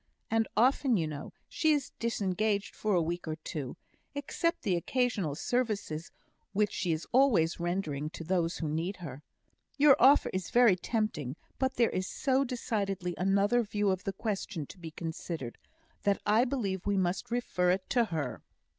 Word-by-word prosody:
And 225 Hz, 0 st, +2 dB
often, 255 Hz, 0 st, +4 dB
you 165 Hz, -, +1 dB
know, 150 Hz, -1 st, -6 dB, 0.2 s
she 315 Hz, -1 st, +2 dB
is 285 Hz, -3 st, -1 dB
disengaged 210 Hz, -2 st, 0 dB
for 215 Hz, -3 st, 0 dB
a 175 Hz, -, +4 dB
week 170 Hz, +1 st, -3 dB
or 155 Hz, -, -2 dB
two, 155 Hz, -2 st, -6 dB, 0.4 s
except 335 Hz, +4 st, -1 dB
the 195 Hz, -6 st, +2 dB
occasional 200 Hz, -, 0 dB
services 205 Hz, -8 st, -1 dB, 0.4 s
which 210 Hz, 0 st, +2 dB
she 180 Hz, -3 st, -1 dB
is 160 Hz, 0 st, -2 dB
always 235 Hz, -12 st, +4 dB
rendering 170 Hz, -4 st, -2 dB
to 165 Hz, -, -8 dB
those 170 Hz, 0 st, 0 dB
who 160 Hz, -, -2 dB
need 165 Hz, +6 st, -2 dB
her. 145 Hz, -7 st, -8 dB, 0.6 s
Your 285 Hz, -2 st, +7 dB
offer 270 Hz, +4 st, +6 dB
is 185 Hz, -2 st, -2 dB
very 240 Hz, -5 st, +6 dB
tempting, 175 Hz, -, -2 dB, 0.2 s
but 265 Hz, 0 st, 0 dB
there 235 Hz, -2 st, +3 dB
is 185 Hz, 0 st, -2 dB
so 270 Hz, -1 st, +1 dB
decidedly 200 Hz, -8 st, -2 dB
another 200 Hz, +5 st, +3 dB
view 205 Hz, -2 st, 0 dB
of 185 Hz, -1 st, -2 dB
the 195 Hz, -, -2 dB
question 195 Hz, -5 st, -3 dB
to 180 Hz, -, -13 dB
be 165 Hz, -2 st, -7 dB
considered, 160 Hz, -5 st, -5 dB, 0.4 s
that 200 Hz, -1 st, +2 dB
I 215 Hz, +4 st, +4 dB
believe 205 Hz, -9 st, -2 dB
we 200 Hz, -1 st, +2 dB
must 180 Hz, 0 st, 0 dB
refer 235 Hz, -7 st, 0 dB
it 185 Hz, +1 st, +1 dB
to 240 Hz, -2 st, +4 dB
her." 145 Hz, -, -3 dB
195 Hz, 170 wpm, -31 LUFS, 170-235 Hz, 0.6 s, Your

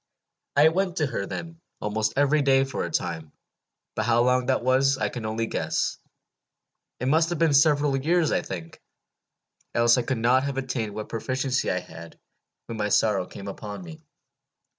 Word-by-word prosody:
I 145 Hz, +2 st, +6 dB
went 180 Hz, +1 st, -1 dB
to 155 Hz, -, +1 dB
her, 115 Hz, -7 st, -3 dB
then, 165 Hz, -1 st, -7 dB, 0.2 s
almost 110 Hz, +1 st, -1 dB
every 145 Hz, +2 st, +3 dB
day 135 Hz, -1 st, +4 dB
for 135 Hz, -1 st, -3 dB
a -, -, -4 dB
time 80 Hz, -2 st, -3 dB, 0.6 s
but -, -, -1 dB
how 120 Hz, 0 st, +4 dB
long 125 Hz, 0 st, +2 dB
that 130 Hz, -2 st, +1 dB
was, 135 Hz, +2 st, +3 dB
I -, -, -1 dB
can 115 Hz, -3 st, -5 dB
only 110 Hz, +1 st, -1 dB
guess. -, -, -2 dB, 1.0 s
It 125 Hz, -, -3 dB
must 160 Hz, +5 st, +3 dB
have 175 Hz, -, -2 dB
been 165 Hz, -2 st, +3 dB
several 145 Hz, -1 st, +4 dB
years, 160 Hz, +4 st, +1 dB
I -, -, +1 dB
think, 85 Hz, -3 st, -8 dB, 0.9 s
else 120 Hz, +1 st, +4 dB
I -, -, +2 dB
could 125 Hz, +1 st, -2 dB
not 120 Hz, +3 st, +3 dB
have 140 Hz, -1 st, -3 dB
attained 120 Hz, -6 st, -3 dB
what 110 Hz, 0 st, -6 dB
proficiency 130 Hz, +3 st, -1 dB
I 90 Hz, -, 0 dB
had 85 Hz, -1 st, -12 dB, 0.5 s
when 115 Hz, -1 st, -7 dB
my 105 Hz, 0 st, 0 dB
sorrow 100 Hz, -3 st, +2 dB
came 100 Hz, -, -9 dB
upon 100 Hz, -1 st, -7 dB
me. 80 Hz, -2 st, -11 dB
125 Hz, 180 wpm, -25 LUFS, 110-140 Hz, 1.0 s, I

